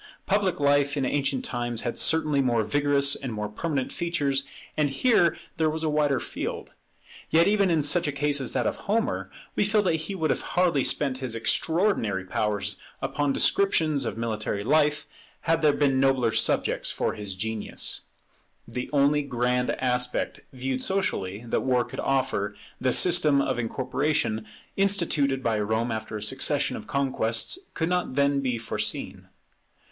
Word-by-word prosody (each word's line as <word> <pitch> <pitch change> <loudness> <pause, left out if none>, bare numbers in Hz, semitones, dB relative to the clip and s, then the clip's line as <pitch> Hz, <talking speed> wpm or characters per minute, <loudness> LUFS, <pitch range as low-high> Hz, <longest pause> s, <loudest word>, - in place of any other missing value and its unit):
Public 195 -4 +1
life 145 0 +2
in 135 - 0
ancient 140 -2 -1
times 120 -2 -3
had 120 - -3
certainly 155 -3 +3
more 120 -4 +2
vigorous 140 +4 +2
and 130 -3 -5
more 105 -1 -3
permanent 135 +5 -3
features, 145 -6 -1 0.3
and 150 -2 +1
here 170 - +3 0.2
there 160 -1 +2
was 160 +1 -3
a 155 - +1
wider 145 -3 +2
field. - - -5 0.6
Yet 165 +1 +4
even 200 -2 +3
in 160 -3 +2
such 150 +3 +3
a - - 0
case 145 0 +1
as 130 - -3
that 125 - 0
of - - -1
Homer, 225 +3 -1 0.3
we - - +2
feel 210 +1 +2
that 165 -4 +1
he 200 - -4
would 160 -4 +1
hardly 175 -6 +1
have - - +1
spent 135 -3 +2
his 130 -3 -2
extraordinary 115 - +1
powers 105 +1 -2 0.2
upon 145 -1 -1
descriptions 155 -4 +2
of 115 - -3
military 110 -3 -2
life, 150 +3 +2 0.4
had 165 0 +1
there 155 -2 +5
been 140 -2 +2
nobler 135 -4 +3
subjects 110 - +1
for - - -1
his 100 -2 -5
genius. 110 +2 -3 0.7
The 125 0 -5
only 145 +1 +3
grand 125 -2 0
aspect, 125 -1 -1
viewed 130 0 -3
socially, 115 - -1
that - - 0
war 125 -2 +1
could - - -8
offer, 130 -7 0 0.2
the 130 - +1
system 155 -2 +4
of 130 -3 0
incorporation 125 -2 -1 0.3
instituted 160 -9 +1
by 110 -2 +1
Rome 110 +3 0
after 110 -1 -4
a 105 - -6
succession 135 +5 +1
of - - -8
conquests, 135 - 0 0.2
could 160 - 0
not 180 -7 -1
then 140 0 +2
be 130 -3 -1
foreseen. 115 0 -4
140 Hz, 160 wpm, -26 LUFS, 120-155 Hz, 0.7 s, there